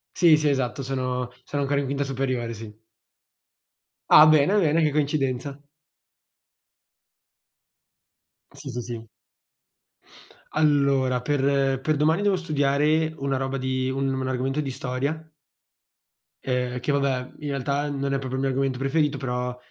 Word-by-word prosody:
Sì, 170 Hz, -4 st, +6 dB
sì 150 Hz, 0 st, +1 dB
esatto 135 Hz, -1 st, -1 dB
sono 125 Hz, -2 st, -3 dB
sono 145 Hz, -1 st, -3 dB
ancora 140 Hz, +1 st, +1 dB
in 140 Hz, -, -3 dB
quinta 140 Hz, +1 st, -1 dB
superiore, 130 Hz, -3 st, -2 dB
sì. 110 Hz, -1 st, -9 dB, 1.4 s
Ah 150 Hz, -, +9 dB
bene, 155 Hz, +7 st, +4 dB
bene 165 Hz, -2 st, +2 dB
che 155 Hz, -, +3 dB
coincidenza. 140 Hz, -2 st, -1 dB, 2.9 s
Sì, -, -, -9 dB
sì, 125 Hz, 0 st, -4 dB
sì. 115 Hz, -1 st, -7 dB, 1.5 s
Allora, 140 Hz, -4 st, +2 dB
per 135 Hz, -1 st, +1 dB
per 155 Hz, +3 st, 0 dB
domani 155 Hz, +5 st, +2 dB
devo 200 Hz, -2 st, +2 dB
studiare 155 Hz, -1 st, +1 dB
una 135 Hz, -1 st, -1 dB
roba 135 Hz, 0 st, -2 dB
di 130 Hz, 0 st, -1 dB
un 135 Hz, 0 st, -1 dB
un 130 Hz, 0 st, -2 dB
argomento 130 Hz, +3 st, -1 dB
di 140 Hz, -, -3 dB
storia 135 Hz, +5 st, -3 dB, 1.2 s
ehm, 125 Hz, -1 st, -2 dB
che 145 Hz, -, -1 dB
vabbè, 135 Hz, -2 st, -1 dB
in 150 Hz, -, -5 dB
realtà 140 Hz, +2 st, -1 dB
non 140 Hz, -1 st, -2 dB
è 135 Hz, -, +1 dB
proprio 130 Hz, -1 st, -5 dB
il -, -, -2 dB
mio 135 Hz, -, 0 dB
argomento 135 Hz, -1 st, -1 dB
preferito, 140 Hz, +1 st, 0 dB
però 125 Hz, -1 st, -3 dB
135 Hz, 135 wpm, -24 LUFS, 130-145 Hz, 2.9 s, Ah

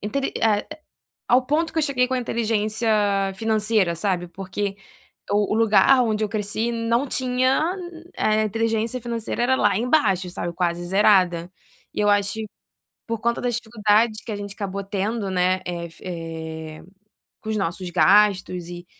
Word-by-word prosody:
entende, 270 Hz, +7 st, -2 dB
eh, 210 Hz, -2 st, +2 dB, 0.6 s
a -, -, +3 dB
ao 255 Hz, -, +3 dB
ponto 315 Hz, +4 st, 0 dB
que 325 Hz, -, -1 dB
eu -, -, +2 dB
cheguei 255 Hz, -4 st, +1 dB
com -, -, -1 dB
a 255 Hz, -, +1 dB
inteligência 225 Hz, -1 st, -1 dB, 0.5 s
financeira, 215 Hz, -4 st, +1 dB
sabe, 175 Hz, 0 st, -1 dB
porque 195 Hz, +2 st, -4 dB, 0.6 s
o 205 Hz, 0 st, +2 dB
o -, -, +1 dB
lugar 230 Hz, +4 st, +5 dB
onde 220 Hz, -2 st, 0 dB
eu -, -, -6 dB
cresci 215 Hz, +2 st, -2 dB
não 230 Hz, +4 st, 0 dB
tinha 260 Hz, +6 st, +1 dB, 0.5 s
eh, 215 Hz, 0 st, +2 dB
inteligência 225 Hz, +3 st, -1 dB
financeira 235 Hz, 0 st, -3 dB
era 260 Hz, +2 st, +3 dB
lá 205 Hz, -6 st, +2 dB
embaixo, 215 Hz, -, +2 dB
sabe, 175 Hz, -1 st, -4 dB
quase 175 Hz, -1 st, -1 dB
zerada. 185 Hz, -3 st, +3 dB, 0.4 s
E -, -, -1 dB
eu 205 Hz, -, +3 dB
acho 200 Hz, 0 st, +1 dB, 0.7 s
por 230 Hz, -1 st, -3 dB
conta 235 Hz, +2 st, 0 dB
das 245 Hz, -2 st, -1 dB
dificuldades 215 Hz, -1 st, +1 dB
que 225 Hz, -, -6 dB
a -, -, -2 dB
gente 205 Hz, 0 st, -6 dB
acabou 200 Hz, -2 st, -4 dB
tendo, 200 Hz, +2 st, -2 dB
né, 185 Hz, 0 st, +1 dB
eh, 170 Hz, -1 st, -4 dB
fi -, -, -17 dB
eh, 160 Hz, -2 st, -6 dB, 0.6 s
com 220 Hz, -, -5 dB
os 215 Hz, -, -1 dB
nossos 180 Hz, -1 st, -3 dB
gastos 185 Hz, 0 st, +3 dB
e 175 Hz, 0 st, -9 dB
210 Hz, 165 wpm, -23 LUFS, 185-230 Hz, 0.7 s, lugar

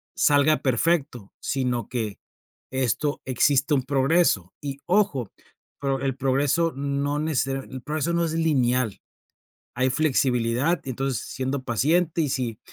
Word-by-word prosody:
salga 145 Hz, +1 st, +4 dB
perfecto, 135 Hz, -, 0 dB
sino 125 Hz, -4 st, -2 dB
que 110 Hz, -5 st, -3 dB, 0.5 s
esto 130 Hz, +3 st, -1 dB
existe 140 Hz, +3 st, +2 dB
un 130 Hz, -3 st, +2 dB
progreso, 135 Hz, -, +2 dB
y 140 Hz, -1 st, -5 dB
ojo 175 Hz, -, +1 dB, 0.5 s
pero 135 Hz, -1 st, -1 dB
el 135 Hz, -2 st, -1 dB
progreso 140 Hz, +5 st, +1 dB
no 140 Hz, +1 st, -1 dB
necesaria 135 Hz, -3 st, -1 dB
el 130 Hz, -1 st, -6 dB
progreso 155 Hz, +3 st, -2 dB
no 170 Hz, 0 st, +2 dB
es 160 Hz, -, -3 dB
lineal, 130 Hz, -9 st, +1 dB, 0.8 s
hay 130 Hz, +1 st, +1 dB
flexibilidad 130 Hz, +1 st, +1 dB
y 135 Hz, -, -5 dB
entonces 135 Hz, -2 st, -2 dB
siendo 130 Hz, +1 st, -3 dB
paciente 160 Hz, -, +1 dB
y 150 Hz, -, 0 dB
si 120 Hz, -5 st, -2 dB
135 Hz, 130 wpm, -25 LUFS, 125-150 Hz, 0.8 s, salga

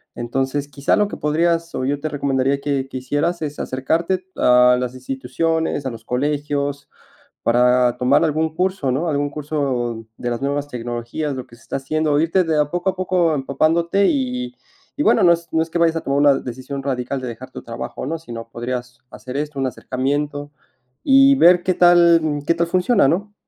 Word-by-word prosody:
Entonces, 135 Hz, +4 st, -2 dB
quizá 140 Hz, 0 st, 0 dB
lo 210 Hz, -1 st, +2 dB
que -, -, -7 dB
podrías, 165 Hz, +2 st, 0 dB
o 130 Hz, -, -2 dB
yo 140 Hz, +1 st, -1 dB
te 155 Hz, -, -3 dB
recomendaría 140 Hz, -1 st, 0 dB
que 140 Hz, -2 st, -1 dB
que 130 Hz, -, -6 dB
hicieras 145 Hz, +7 st, -1 dB
es 150 Hz, -1 st, -4 dB
acercarte 165 Hz, +8 st, -1 dB
a 125 Hz, 0 st, +5 dB
las 125 Hz, -1 st, -3 dB
instituciones, 135 Hz, +4 st, -2 dB
a -, -, -3 dB
los 115 Hz, -1 st, -11 dB
colegios, 145 Hz, +1 st, -2 dB, 0.6 s
para 125 Hz, +1 st, +3 dB
tomar 140 Hz, +5 st, +3 dB
algún 160 Hz, 0 st, 0 dB
curso, 185 Hz, -5 st, 0 dB
¿no? 155 Hz, +7 st, -1 dB
Algún 145 Hz, -1 st, 0 dB
curso 135 Hz, -6 st, -3 dB
de 120 Hz, -, -4 dB
las 120 Hz, -, -3 dB
nuevas 140 Hz, +1 st, -1 dB
tecnologías, 120 Hz, +4 st, -4 dB
lo 130 Hz, -1 st, -6 dB
que 120 Hz, -, -17 dB
se 115 Hz, -, -22 dB
está -, -, -4 dB
haciendo, 150 Hz, +2 st, 0 dB
irte 165 Hz, +4 st, +2 dB
de 160 Hz, -2 st, 0 dB
a 150 Hz, -1 st, +1 dB
poco 175 Hz, +3 st, -2 dB
a 190 Hz, -, -11 dB
poco 180 Hz, -3 st, +1 dB
empapándote. 165 Hz, +7 st, +1 dB
Y 255 Hz, -2 st, -2 dB, 0.4 s
y -, -, +2 dB
bueno, -, -, +4 dB
no 170 Hz, -, +7 dB
es 170 Hz, 0 st, -2 dB
no 160 Hz, -, +2 dB
es 165 Hz, -, -5 dB
que -, -, -6 dB
vayas 165 Hz, -1 st, +3 dB
a -, -, 0 dB
tomar 140 Hz, +1 st, 0 dB
una 145 Hz, -1 st, +6 dB
decisión 130 Hz, +3 st, -6 dB
radical 130 Hz, 0 st, -2 dB
de 130 Hz, -, -5 dB
dejar 125 Hz, +3 st, -9 dB
tu -, -, -8 dB
trabajo, 115 Hz, +2 st, -6 dB
¿no? 165 Hz, +4 st, -3 dB
Si 160 Hz, -7 st, -11 dB
no 115 Hz, 0 st, -7 dB
podrías 120 Hz, 0 st, -5 dB
hacer 130 Hz, +1 st, -8 dB
esto, 150 Hz, -1 st, -4 dB
un 135 Hz, -, 0 dB
acercamiento 145 Hz, +3 st, -3 dB, 0.5 s
y 275 Hz, 0 st, +6 dB
ver 175 Hz, -6 st, +6 dB
qué 185 Hz, -, +1 dB
tal 175 Hz, -2 st, +5 dB, 0.2 s
qué 170 Hz, -, +3 dB
tal 170 Hz, 0 st, 0 dB
funciona, 180 Hz, -, +3 dB
¿no? 200 Hz, +7 st, -1 dB
145 Hz, 195 wpm, -20 LUFS, 130-165 Hz, 0.6 s, no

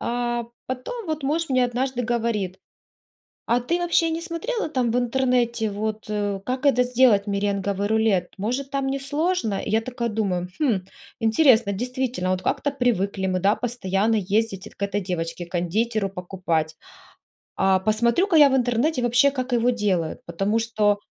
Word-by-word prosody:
а 240 Hz, 0 st, -1 dB, 0.2 s
потом 340 Hz, -, -5 dB
вот 310 Hz, -1 st, -3 dB
муж 315 Hz, +4 st, 0 dB
мне 255 Hz, -1 st, +3 dB
однажды 245 Hz, +1 st, -1 dB
говорит: 225 Hz, -6 st, -1 dB, 0.9 s
"А 235 Hz, +1 st, +2 dB
ты 335 Hz, +8 st, -1 dB
вообще 345 Hz, -1 st, +2 dB
не 325 Hz, +1 st, -3 dB
смотрела 345 Hz, +4 st, -3 dB
там 255 Hz, -5 st, 0 dB
в 240 Hz, -, +1 dB
интернете 245 Hz, -2 st, +1 dB
вот, 215 Hz, +1 st, -4 dB
э, 205 Hz, -2 st, -2 dB
как 255 Hz, +2 st, -2 dB
это 260 Hz, -3 st, +4 dB
сделать 245 Hz, -5 st, +3 dB
меренговый 200 Hz, 0 st, -1 dB
рулет, 220 Hz, -5 st, +2 dB
может, 250 Hz, +7 st, -2 dB
там 275 Hz, -1 st, -1 dB
несложно?" 275 Hz, -, -1 dB
Я 220 Hz, +2 st, +1 dB
такая 240 Hz, 0 st, -3 dB
думаю: 195 Hz, -5 st, -1 dB
"Хм, 240 Hz, -11 st, +2 dB, 0.4 s
интересно". 225 Hz, -2 st, +4 dB
Действительно, 245 Hz, -3 st, -2 dB
вот 185 Hz, -, 0 dB
как-то 285 Hz, -, 0 dB
привыкли 200 Hz, -8 st, 0 dB
мы, 185 Hz, -1 st, 0 dB
да, 195 Hz, +3 st, +3 dB
постоянно 225 Hz, -3 st, 0 dB
ездить 205 Hz, 0 st, -1 dB
к -, -, -11 dB
этой 200 Hz, +1 st, -1 dB
девочке-кондитеру 180 Hz, +5 st, -2 dB
покупать, 175 Hz, -4 st, -2 dB, 0.8 s
а 190 Hz, 0 st, +3 dB
посмотрю-ка 235 Hz, -, +2 dB
я 290 Hz, -2 st, +8 dB
в 265 Hz, -, +2 dB
интернете 250 Hz, +3 st, +1 dB
вообще, 245 Hz, +4 st, +4 dB
как 260 Hz, -2 st, -4 dB
его 240 Hz, 0 st, +3 dB
делают, 195 Hz, -9 st, -1 dB
потому 195 Hz, +6 st, -1 dB
что 215 Hz, -3 st, +1 dB
230 Hz, 150 wpm, -23 LUFS, 200-255 Hz, 0.9 s, я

